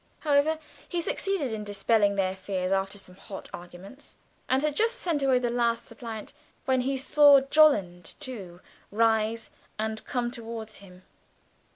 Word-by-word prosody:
However, 300 +1 +2 0.3
he 350 - -1
succeeded 340 - -1
in 215 -1 -4
dispelling 205 0 +2
their 190 -1 0
fears 190 -1 -3
after 195 +1 0
some 185 -2 -12
hot 195 +1 -10
arguments, 175 +10 -11 0.3
and 265 +2 +2
had 300 -1 0
just 455 +5 +2
sent 340 -11 -1
away 265 -2 +3
the 245 -1 -1
last 235 -1 0
suppliant, 225 -1 -8 0.3
when 260 -1 +2
he 270 +2 -1
saw 285 +1 +6
Jolland 265 - +3
too 190 -9 -8 0.3
rise 225 +1 +1 0.3
and 220 0 -3
come 245 -2 -2
towards 225 -2 -7
him. 185 -2 -15
230 Hz, 150 wpm, -27 LUFS, 200-275 Hz, 0.3 s, saw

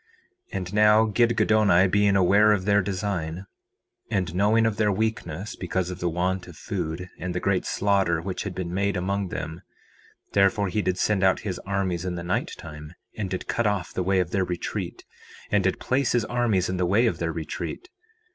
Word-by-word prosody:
4:24 - - -3
And 90 0 -5
now, 105 +1 +5
Gidgiddoni 110 -4 +3
being 100 0 +3
aware 100 +3 +5
of 95 -3 -1
their 100 0 +4
design, 95 -3 -3 0.6
and 95 -6 -1
knowing 105 +4 +3
of 110 -2 0
their 105 -2 +2
weakness 100 -3 -2
because 90 0 -2
of 90 - -7
the 90 - 0
want 90 +2 -1
of 90 - -12
food, 90 -2 -4
and 90 -1 -4
the - - 0
great 95 0 0
slaughter 95 -4 +1
which 90 +3 -4
had 100 -3 -5
been 90 -1 -4
made 100 0 0
among 100 +2 -1
them, 80 -1 -5 0.7
therefore 100 0 +3
he 105 +4 0
did 95 -2 -1
send 100 0 +1
out 95 0 +3
his 95 -4 -4
armies 95 -3 -1
in 90 -1 -3
the 85 - -5
night 85 - -1
time, 75 +1 -10 0.2
and 100 -3 -3
did 95 0 -4
cut 120 -2 0
off 100 -3 -2
the - - -1
way 95 +1 +2
of 90 -1 -1
their 95 - +1
retreat, 90 -1 -4 0.5
and 105 -2 +3
did 95 - +1
place 130 +1 +1
his 120 -3 +2
armies 115 -7 +1
in 90 - -2
the 90 -1 +1
way 105 +7 +3
of 115 - 0
their 85 -1 -1
retreat. 80 - -5
95 Hz, 200 wpm, -25 LUFS, 90-105 Hz, 0.7 s, now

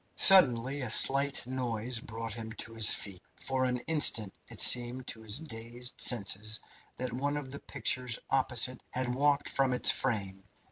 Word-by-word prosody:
Suddenly 140 -7 +4
a 125 - -6
slight 140 +4 +1
noise 125 -2 -5
brought 115 -1 -8
him 110 -1 -9
to 115 0 -9
his 110 -1 +4
feet. 95 -3 -4
For 130 -1 -4
an 125 0 -3
instant 120 -11 +3 0.2
it - - -11
seemed 125 +1 +6
to 110 - -8
his 110 +1 -3
dazed 120 -4 -6
senses 110 -1 +3 0.4
that 125 -2 -7
one 145 +4 -4
of 135 -3 -8
the 140 - -9
pictures 125 -3 -4
opposite 130 -1 -1
had 125 -1 -5
walked 145 +2 -1
from 135 -2 -1
its 125 - +5
frame. 100 -7 -4
125 Hz, 160 wpm, -28 LUFS, 115-135 Hz, 0.4 s, seemed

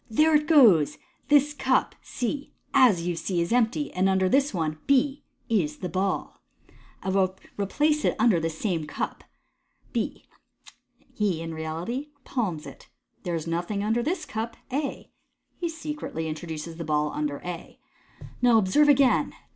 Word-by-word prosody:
'* - - -35
There 315 +1 +6
it 300 0 +2
goes! 225 - +6 0.3
This 295 0 +4
cup 265 -2 +1
(C), 275 +4 -4 0.2
as 235 -11 +5
you 175 -1 -1
see, 175 +1 -2
is 170 +6 0
empty, 250 +5 +1
and 185 +1 +2
under 190 -1 +2
this 275 +7 +3
one 155 -4 -2
(B) 275 +1 +2 0.2
is 165 -10 0
the 180 - -4
ball. 190 +3 -2 0.6
I - - -2
will 190 -1 +1 0.2
replace 295 +10 +1
it - - +2
under 220 -6 +4
this 160 -1 -3
same 170 -7 -1
cup - - -4 0.4
" - - -37
(B). - - -3 0.9
He 200 -6 0
in 165 0 -5
reality 165 - -4 0.2
palms 185 - -2
it. - - -12 0.2
" - - -45
There 175 -2 -2
is 160 - -3
nothing 175 +5 -2
under 225 +3 +1
this 325 +7 -2
cup" 230 -4 -4 0.2
(A). 280 +1 -3 0.5
He 345 - -1
secretly 300 - -5
introduces 160 +1 -6
the 170 - -4
ball 150 -1 0
under 150 -1 -2
A. 175 -1 -7 0.4
u - - -12
Now 240 -2 +6
observe 220 +9 +4
again. 275 -2 +4
200 Hz, 165 wpm, -26 LUFS, 165-270 Hz, 0.9 s, There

